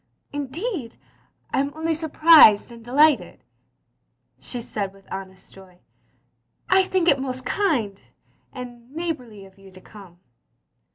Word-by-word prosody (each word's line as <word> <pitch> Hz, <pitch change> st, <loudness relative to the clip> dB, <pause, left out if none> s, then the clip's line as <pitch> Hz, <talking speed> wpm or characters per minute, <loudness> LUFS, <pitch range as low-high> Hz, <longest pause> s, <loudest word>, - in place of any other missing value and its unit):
" -, -, -42 dB
Indeed, 290 Hz, -, -5 dB, 0.6 s
I -, -, +1 dB
'm 280 Hz, +1 st, -3 dB
only 320 Hz, +1 st, -1 dB
surprised 310 Hz, -8 st, +6 dB
and 230 Hz, -1 st, -13 dB
delighted, 250 Hz, -, +2 dB, 0.5 s
*' 120 Hz, +1 st, -48 dB
she 245 Hz, -, -7 dB
said 200 Hz, -4 st, -5 dB
with 195 Hz, -1 st, -20 dB
honest 190 Hz, -1 st, -9 dB
joy, 190 Hz, -2 st, -17 dB, 0.5 s
" -, -, -42 dB
I -, -, -2 dB
think 370 Hz, -2 st, 0 dB
it 280 Hz, -5 st, +4 dB
most 255 Hz, -1 st, -5 dB
kind 250 Hz, -, -1 dB, 0.5 s
and 240 Hz, -1 st, -10 dB
— -, -, -7 dB
^neighbourly 250 Hz, -, -5 dB
of 190 Hz, 0 st, -20 dB
you 195 Hz, 0 st, -15 dB
to 185 Hz, 0 st, -15 dB
come." 190 Hz, -5 st, -15 dB
240 Hz, 150 wpm, -23 LUFS, 195-305 Hz, 0.6 s, surprised